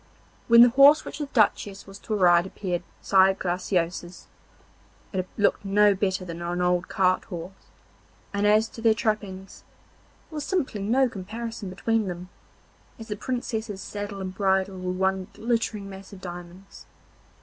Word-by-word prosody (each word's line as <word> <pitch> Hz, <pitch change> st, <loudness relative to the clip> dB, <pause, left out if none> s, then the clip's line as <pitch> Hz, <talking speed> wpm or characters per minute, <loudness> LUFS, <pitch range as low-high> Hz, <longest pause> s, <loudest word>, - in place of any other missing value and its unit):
When 235 Hz, 0 st, +9 dB
the 245 Hz, -, +7 dB
horse 275 Hz, +4 st, +6 dB
which -, -, -7 dB
the 295 Hz, -, -3 dB
Duchess 205 Hz, -5 st, +1 dB
was 195 Hz, 0 st, -12 dB
to 215 Hz, -, -3 dB
ride 175 Hz, -2 st, +4 dB
appeared 180 Hz, -3 st, -3 dB, 0.2 s
beside 190 Hz, 0 st, +4 dB
Graciosa's, 175 Hz, -1 st, -2 dB, 0.9 s
it 185 Hz, -1 st, -2 dB
looked 205 Hz, -1 st, +2 dB
no 205 Hz, +1 st, +4 dB
better 190 Hz, -1 st, -1 dB
than 170 Hz, -1 st, -7 dB
an 175 Hz, +1 st, -3 dB
old 180 Hz, 0 st, +1 dB
cart 185 Hz, -1 st, +1 dB
horse, 175 Hz, +1 st, -7 dB, 0.8 s
and 200 Hz, +1 st, +1 dB
as 215 Hz, +1 st, +4 dB
to 225 Hz, -, -10 dB
their 225 Hz, -1 st, +4 dB
trappings, 205 Hz, -4 st, -3 dB, 0.7 s
there 310 Hz, -, -6 dB
was 295 Hz, -, -3 dB
simply 280 Hz, -, -2 dB
no 250 Hz, +6 st, +3 dB
comparison 225 Hz, +1 st, -6 dB
between 220 Hz, +3 st, 0 dB
them, 180 Hz, 0 st, -6 dB, 0.7 s
as 225 Hz, -1 st, -10 dB
the 210 Hz, -, -2 dB
Princess's 220 Hz, -3 st, -4 dB
saddle 205 Hz, -1 st, -6 dB
and 185 Hz, -1 st, -5 dB
bridle 190 Hz, -1 st, 0 dB
were 185 Hz, 0 st, -3 dB
one 190 Hz, 0 st, 0 dB
glittering 225 Hz, -3 st, -1 dB
mass 195 Hz, 0 st, -11 dB
of 200 Hz, -, -11 dB
diamonds. 175 Hz, +1 st, -10 dB
195 Hz, 155 wpm, -25 LUFS, 185-220 Hz, 0.9 s, When